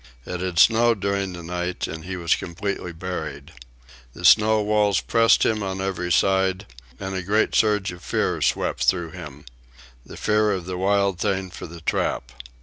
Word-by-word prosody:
It 90 - -5
had 90 -1 -3
snowed 115 +3 +5
during 100 -1 -1
the 85 -1 -8
night 90 +1 -3
and 80 0 -7
he 95 +1 -4
was 85 -1 +1
completely 90 0 -4
buried. 90 +2 -6 0.6
The 85 - -7
snow 110 +3 +6
walls 105 -2 +2
pressed 115 -1 +3
him 110 -1 +1
on 95 -1 -3
every 95 -2 -3
side, 95 +1 +2 0.3
and 95 0 -5
a 95 - -2
great 105 +5 +1
surge 105 -3 +2
of 90 -1 -11
fear - - -1
swept - - 0
through 85 -3 +1
him—the 60 -6 -13
fear 105 -1 +2
of 90 -3 -4
the 90 0 -5
wild 100 -1 +1
thing 95 -2 -1
for 90 - -8
the 85 0 -11
trap. 65 -5 -1
95 Hz, 170 wpm, -23 LUFS, 85-100 Hz, 0.6 s, snow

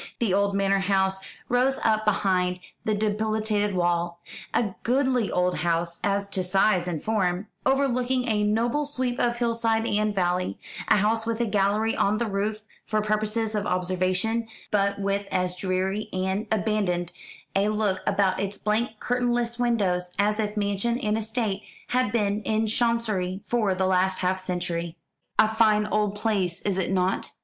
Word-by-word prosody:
The 220 -6 0
old 200 0 +2
manor 195 0 +2
house 190 0 +1 0.3
rose 255 +2 +2
up 215 -1 +2
behind 185 -3 +1 0.3
the 215 - +1
dilapidated 215 -1 0
wall 175 -1 0 0.3
a 210 -5 0
goodly 255 -2 +1
old 180 0 +1
house 170 0 -1
as 200 0 0
to 190 -2 -1
size 185 0 +2
and 165 -4 -3
form 195 -2 0 0.2
overlooking 260 -2 +1
a 215 -2 +1
noble 235 +8 +1
sweep 255 -3 -1
of 240 0 +1
hillside 230 -1 +1
and 210 -1 0
valley; 180 - 0 0.3
a - - +5
house 220 +3 +1
with 230 0 -1
a 235 - +2
gallery 210 +1 +1
on 205 +2 +2
the 235 - 0
roof 210 +1 -2 0.2
for 215 - 0
purposes 215 +1 0
of 210 0 -1
observation, 185 +5 0 0.2
but 200 -1 +1
with 200 0 -1
as 180 0 0
dreary 190 +3 -1
and 190 +3 -1
abandoned 200 -5 0 0.4
a 200 +1 +3
look 210 -3 0
about 190 -2 +2
its 200 0 -3
blank 215 +1 -1
curtainless 240 -1 0
windows 195 -7 +1
as 210 +2 +2
if 210 0 -2
mansion 205 +3 0
and 215 -3 0
estate 220 -2 -2 0.3
had 250 -3 +1
been 210 -2 0
in 220 +1 0
Chancery 220 -5 0
for 215 -6 +1
the 190 0 0
last 185 0 +2
half 185 +1 +1
century. 175 -2 -3 0.4
"A 215 - +6
fine 215 -1 +3
old 210 -1 0
place, 200 -5 0
is 195 -2 -1
it 185 - -1
not?" 185 0 0
210 Hz, 160 wpm, -25 LUFS, 190-225 Hz, 0.4 s, A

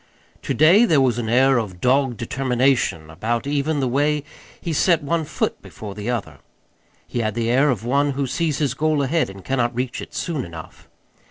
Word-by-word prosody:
To - - -2
day 175 - +6
there 160 -10 +3
was 125 -3 +2
an 110 -2 -3
air 130 +2 +4
of 95 -6 -6
dogged 130 +1 +2
determination 125 - 0
about 115 +9 -2
even 145 +1 0
the 130 - +1
way 145 +3 +1 0.4
he 170 - -3
set 165 +1 +3
one 160 +2 -1
foot - - -2
before 105 -2 -9
the 105 +3 -5
other. 120 -4 -3 0.7
He 120 - -4
had 110 -2 -1
the 115 0 0
air 135 +4 +4
of 115 -4 -1
one 140 +3 +1
who 140 +1 -1
sees 150 +3 -1
his 145 -4 0
goal 150 0 +1
ahead 155 +1 +1
and 95 -1 -12
cannot 120 -3 0
reach 125 0 -3
it - - -10
soon 160 -6 -2
enough. 80 -2 -11
130 Hz, 195 wpm, -22 LUFS, 120-145 Hz, 0.7 s, day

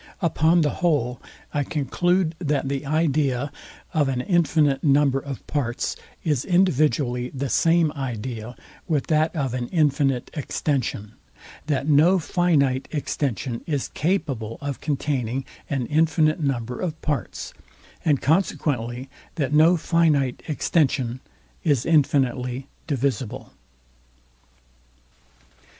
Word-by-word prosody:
Upon 170 -1 +3
the 150 -2 +2
whole, 140 -8 +1 0.3
I 145 - +1
conclude, 170 +5 0
that 145 -5 0
the 140 +1 -3
idea 145 -3 +1 0.4
of 150 -4 +2
all 135 - -1
infinite 155 -6 +2
number 140 -2 +4
of 135 -1 -7
parts 130 -5 -2 0.3
is 150 -7 +1
individually 150 -9 +2
the 135 0 -2
same 165 +1 +3
idea 125 -3 -5 0.3
with 150 -5 0
that 155 +3 +2
of 135 -5 -1
an 125 -1 -2
infinite 140 -5 +1
extension; 135 -7 -2 0.6
that 140 -2 0
no 155 +6 +5
finite 150 -7 +1
extension 130 - -2
is 145 -5 -1
capable 145 - -1
of 140 -2 -5
containing 135 -4 -1 0.2
an 135 -4 -1
infinite 155 +2 +2
number 125 -5 -2
of 160 -3 -3
parts; 150 -2 -3 0.5
and 145 -4 +2
consequently 130 -7 0 0.3
that 145 -3 -1
no 160 +4 +6
finite 155 -6 +2
extension 130 -5 +1 0.4
is 145 -7 +2
infinitely 135 -5 +1 0.2
divisible. 135 -5 -2
145 Hz, 110 wpm, -24 LUFS, 130-155 Hz, 0.6 s, no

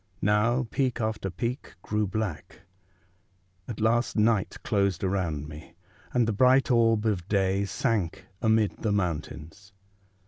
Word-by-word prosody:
Now 115 +5 +2
peak 130 -3 0
after 110 -3 -2
peak 120 +9 -4
grew 105 0 0
black; 100 -4 -4 1.1
at 115 - -6
last 115 +2 +1
night 110 -2 +2
closed 100 -4 0
around 85 -6 -1
me, 75 +2 -11 0.4
and 120 -2 +2
the 115 - 0
bright 130 +5 +4
orb 115 -2 +3
of 95 -5 -1
day 100 -1 +1
sank 100 -3 -1 0.2
amid 110 -2 +2
the 110 - -1
mountains. 90 +1 -4
105 Hz, 130 wpm, -27 LUFS, 95-115 Hz, 1.1 s, bright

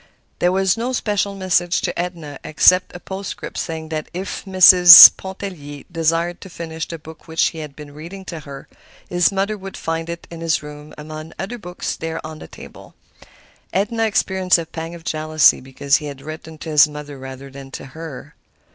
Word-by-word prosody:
There 175 - +2
was 190 +1 +1
no 245 +3 -3
special 205 -4 -1
message 180 -2 0
to - - -3
Edna 170 -5 -5
except 180 +5 +3
a - - -7
postscript 190 +1 -7
saying 160 -2 -5
that 155 -1 -5
if 190 +2 -5
Mrs. 180 -2 +10
Pontellier 180 -7 -8
desired 165 +1 -1
to 190 - -10
finish 165 -1 -6
the 165 - -7
book 160 +1 -14
which 160 0 +1
he 165 - -10
had 150 -3 -8
been 150 -1 -12
reading 170 +6 -10
to 165 -3 -7
her, 140 -2 -11 0.4
his 175 +1 +2
mother 200 +2 -1
would 195 0 -9
find 165 0 -4
it 170 0 -7
in 165 -1 -9
his 165 -2 0
room, 150 0 -11
among 155 +1 -9
other 235 +6 -6
books 180 -3 -5
there 165 0 -5
on 155 0 -9
the - - -11
table. - - -14 0.8
Edna 225 +4 0
experienced 190 -3 +1
a 165 - -4
pang 165 +1 -7
of 170 - -13
jealousy 155 -2 +2
because 135 +2 0
he 150 - -7
had 140 -2 -8
written 155 +1 -9
to 160 - -8
his 150 -1 +6
mother 150 -2 -9
rather 135 +1 -10
than 135 0 -11
to - - -9
her. 160 -4 -9
165 Hz, 190 wpm, -20 LUFS, 155-185 Hz, 0.8 s, Mrs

